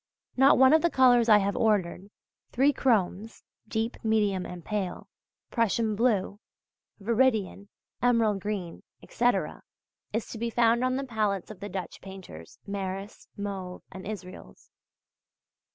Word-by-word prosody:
Not 270 +2 +6
one 265 +2 +6
of 315 - +5
the 340 - +3
colours 245 -5 +4
I 210 - +8
have 200 0 0
ordered: 200 -3 0 0.4
three 275 +3 +3
chromes 220 -4 0 0.2
(deep, 225 +2 -2
medium 210 -4 +1
and 180 -1 -9
pale), 200 -4 -3 0.4
Prussian 230 -1 +1
blue, 205 -3 0 0.6
veridian, 215 -3 0 0.3
emerald 230 -4 +2
green 195 -4 -5 0.2
etc.{V} 245 +1 0 0.5
is 225 +1 -2
to 225 - -7
be 235 +1 -1
found 235 +1 +3
on 255 0 +1
the 275 - -2
palettes 215 -6 -2
of 215 - -11
the 205 - -6
Dutch 185 -4 -6
painters 185 - -11
Maris, 195 0 -5
Mauve 195 -3 -5
and 190 0 -9
Israels. 190 -4 -9
210 Hz, 135 wpm, -27 LUFS, 195-235 Hz, 0.6 s, I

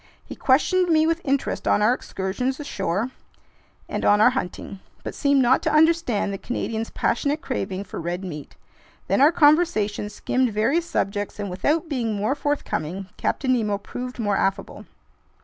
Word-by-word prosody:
He - - -8
questioned 350 +7 +2
me 315 -1 +4
with 330 +1 0
interest 275 -1 -1
on 210 - +3
our 225 +4 +5
excursions 250 +5 -3
ashore 200 - -2 0.8
and - - -4
on 205 - +4
our 230 +4 +6
hunting, 195 -5 -5 0.2
but - - -5
seemed 280 -2 +2
not 250 +2 +4
to - - 0
understand 305 -10 +2
the 195 - -5
Canadian's 225 -2 -3
passionate 285 +5 0
craving 195 -9 -3
for 185 - -7
red 175 +3 -3
meat. 150 -6 -8 0.5
Then - - +2
our 295 +3 +7
conversation 290 -11 +3
skimmed 250 +3 0
various 270 +12 +1
subjects, 205 -4 -2
and 200 -2 -3
without 300 - 0
being 240 -7 -1
more 210 +6 0
forthcoming, 195 - -3
Captain 260 -2 0
Nemo 210 -4 0
proved 250 +5 -7
more 205 -4 0
affable. 195 0 -2
245 Hz, 160 wpm, -23 LUFS, 200-290 Hz, 0.8 s, our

